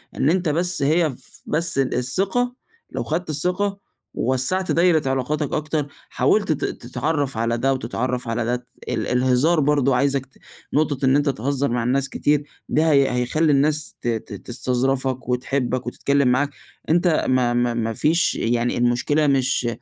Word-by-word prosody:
إن 140 - +2
أنت 175 -1 +1
بس 170 +1 +1
هي 160 +3 +3
ف 130 - -9
بس 165 0 -1
ال 135 -1 +1
الثقة، 195 - 0 0.4
لو - - -3
خدت 165 +2 -3
الثقة، 180 +6 -1 0.3
ووسّعت 130 +10 0
دايرة 165 -5 +3
علاقاتك 135 +3 -1
أكتر، 155 -1 -1 0.2
حاولت - - +1
ت - - -1
تتعرّف 145 -6 -2
على 115 +1 0
ده، 135 +3 +1
وتتعرّف 125 0 -3
على 115 0 -1
ده. 120 +1 0
ت 125 0 -8 0.2
ال - - -2
الهزار 130 +6 +2
برضه، 140 -2 +2
عايزك 135 +1 +1
ت 135 - -27 0.4
نقطة 145 -2 +1
إن 130 +1 +4
أنت 145 0 +2
تهزّر 140 +2 -1
مع 120 -1 0
الناس 135 +3 0
كتير 145 0 +1 0.3
ده 160 +1 +2
هي 140 -2 +4
هيخلّي 125 +6 +1
الناس 150 +2 +1
ت - - -4
ت 115 -2 -3
تستظرفك، 130 +1 -1
وتحبك، 125 0 -1
وتتكلّم 140 +2 +1
معاك. 130 +3 +2 0.4
أنت 170 0 +2
ما 125 -2 +2
ما 120 0 +1
ما 115 -1 -2
فيش 160 +9 +2
يعني 120 +1 0
المشكلة 125 +5 +2
مش 135 -3 +1
135 Hz, 165 wpm, -22 LUFS, 125-155 Hz, 0.4 s, إن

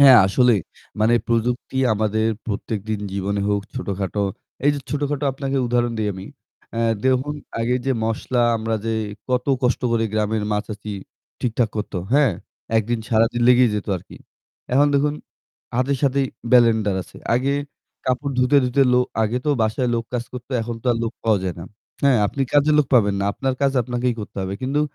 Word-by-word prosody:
হ্যাঁ, 135 -4 +9
আসলেই। 120 0 +3 0.4
মানে 115 +2 +4
প্রযুক্তি 120 +3 -1 0.2
আমাদের 110 +1 +1 0.2
প্রত্যেকদিন 105 0 -3
জীবনে 100 +1 -1
হোক, 100 0 +1
ছোটখাটো। 100 -4 -2 0.4
এই 145 - +6
যে 140 - -4
ছোটখাটো 145 0 -1
আপনাকে 135 0 -3
উদাহরণ 120 0 +1
দেই 105 -1 0
আমি। 95 +1 -8 0.5
আ - - -1 0.3
দেখুন 130 +3 +1 0.3
আগে 120 +2 +1
যে 135 - +3
মসলা 120 +2 -1 0.2
আমরা 110 0 -2
যে 115 - 0 0.4
কত 125 -1 0 0.2
কষ্ট 125 -1 +2
করে 115 -1 +2
গ্রামের 110 0 0
মা-চাচি 105 0 -4 0.5
ঠিকঠাক 115 -1 +1
করত। 105 - -4 0.2
হ্যাঁ। 140 -6 +4 0.4
একদিন 115 +2 +1
সারাদিন 115 +1 +2
লেগেই 125 -1 +6
যেত 105 - -3
আরকি। - - -12 0.6
এখন 145 +3 +5
দেখুন 145 +1 +2 0.6
হাতের 130 +2 +1
সাথেই 140 -1 +2 0.3
ব্লেন্ডার 110 -5 +5
আছে। - - -17 0.2
আগে 130 +3 +1 0.5
কাপড় 130 +2 -1
ধুতে, 125 +3 +4
ধুতে, 125 +2 +3
লো 125 - +5 0.2
আগে 110 +3 0
তো - - +3
বাসায় 110 +3 0
লোক 115 0 -1
কাজ 120 -1 -1
করতো, 125 +1 -9
এখন 120 +1 -4
তো - - -7
আর 115 - -1
লোক 115 0 -2
পাওয়া 110 -2 +3
যায় 90 -3 -2
না। 85 - -7 0.4
হ্যাঁ 135 -5 +5
আপনি 135 +6 -2
কাজের 145 +1 +4
লোক 145 - +4
পাবেন 105 -5 +4
না। - - 0
আপনার 135 +2 -1
কাজ 135 -1 +3
আপনাকেই 125 0 -1
করতে 105 - -9
হবে। 95 +1 -3
কিন্তু 135 +3 0
120 Hz, 175 wpm, -22 LUFS, 110-130 Hz, 0.6 s, হ্যাঁ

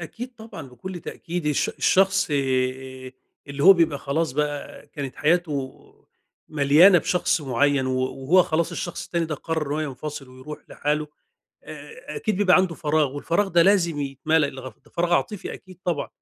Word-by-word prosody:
أكيد 240 +9 -8
طبعًا 220 - -10
بكل 175 +9 -8
تأكيد 170 0 -6
الش 150 -2 +1
الشخص 190 0 +2
آآ 130 -1 -2 0.4
اللي 140 0 -4
هو 195 - +11
بيبقى 165 -6 +1
خلاص 150 +1 -1
بقى 145 0 -4
كانت 140 -4 -7
حياته 150 -4 -1 0.7
مليانة 155 +6 +6
بشخص 180 +1 0
معيّن 140 0 +1
و 130 0 0
وهو 135 +7 +2
خلاص 170 +1 -1
الشخص 175 0 -5
التاني 170 -1 -1
ده 160 -1 -3
قرّر 160 +1 -3
إن - - -2
هو 155 - -1
ينفصل 145 -1 -6
ويروح 130 +4 -10
لحاله، 150 +1 -2 0.6
أ 470 +2 -10
أكيد 215 -3 -1
بيبقى 190 -2 +5
عنده 185 -2 +1
فراغ 150 -3 0
والفراغ 170 +7 0
ده 170 -2 +4
لازم 170 -5 +2
يتملى 145 +2 0
الغف 130 -2 -9
ده - - -20
فراغ 175 0 +1
عاطفي 200 +1 -2
أكيد 185 -2 -14
طبعًا. 170 -5 -1
155 Hz, 165 wpm, -24 LUFS, 140-175 Hz, 0.7 s, هو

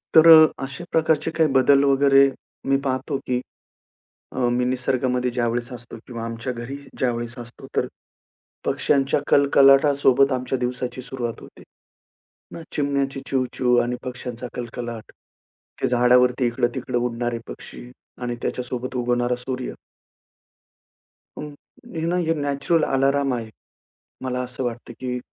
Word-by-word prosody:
तर 160 +1 +8 0.4
अशा 140 +5 -6
प्रकारचे 160 0 +1
काही 160 -2 +4
बदल 140 +1 +5
वगैरे 140 0 +5 0.4
मी 135 - +4
पाहतो 130 +1 -1
की, 125 -1 +1 0.9
अ, - - -6 0.2
मी 125 - +1
निसर्गामध्ये 125 0 0
ज्यावेळेस 120 0 -1
असतो. 120 -1 -9
किंवा 115 -2 -6
आमच्या 115 +2 -4
घरी 120 +3 -6 0.2
ज्यावेळेस 120 -1 -2
असतो. 120 0 -10
तर - - +2 0.8
पक्ष्यांच्या 140 0 +1
कलकलाटासोबत 140 -1 +5
आमच्या 130 0 -1
दिवसाची 125 +1 -3
सुरुवात 120 -2 -5
होते. - - -14 0.9
मग 165 - -7
चिमण्यांची 140 -1 -1
चिवचिव 125 -1 +1
आणि 125 +1 -2
पक्ष्यांचा 125 -1 -6
कलकलाट. 120 -2 -6 0.7
ते - - +2
झाडावरती 125 +1 +4
इकडं-तिकडं 120 +1 -1
उडणारे 120 0 -2
पक्षी 125 - -10 0.3
आणि 120 -1 -2
त्याच्यासोबत 125 0 -4
उगवणारा 120 0 0
सूर्य. 125 +1 -5 1.6
हं. 150 - -6 0.5
हे 160 0 -2
ना 175 - 0
हे 165 - +2
नॅचरल 145 +2 0
अलार्म 135 0 +1
आहे. 115 -2 -4 0.7
मला 125 0 -2
असं 125 +1 -5
वाटतं, 120 0 -5
की 125 -1 -3
125 Hz, 125 wpm, -23 LUFS, 120-135 Hz, 1.6 s, तर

